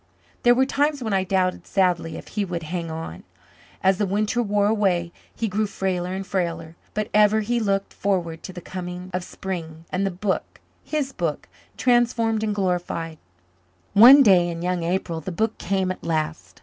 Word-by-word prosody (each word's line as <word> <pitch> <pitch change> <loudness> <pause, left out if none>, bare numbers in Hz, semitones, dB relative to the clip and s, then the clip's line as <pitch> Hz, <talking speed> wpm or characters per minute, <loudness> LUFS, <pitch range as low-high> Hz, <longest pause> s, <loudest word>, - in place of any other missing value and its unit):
There 240 0 +5
were 260 +2 +4
times 285 0 0
when 220 -3 -2
I 190 -1 +2
doubted 185 -1 0
sadly 175 -4 +1
if - - -10
he 210 - -1
would 175 -3 -4
"hang 165 +1 -4
on." 160 - -6 0.6
As 190 0 +3
the 205 - +1
winter 210 +5 0
wore 205 -2 +1
away 190 -5 +1 0.2
he 225 - -1
grew 210 +2 0
frailer 185 -3 -2
and 195 0 -4
frailer. 170 -4 -3 0.2
But 215 0 -1
ever 210 +1 +5
he 240 +3 0
looked 195 -3 -1
forward 175 -5 -1
to - - -8
the 180 -1 -9
coming 180 +1 -7
of 180 0 -2
spring 165 -4 -6
and 185 +2 0
"the 195 - +1
book," 190 +2 -3 0.2
his 290 -3 -2
book, 165 -4 -3 0.3
transformed 235 -3 +2
and 210 -1 -1
glorified. 175 -4 -2 0.7
One 255 +7 +9
day 180 -6 +5
in 170 0 -5
young 180 -1 0
April 170 -1 -2
the 175 - -5
book 220 +6 -1
came 190 0 0
at 185 - -8
last. 160 -1 -3
190 Hz, 180 wpm, -23 LUFS, 175-210 Hz, 0.7 s, One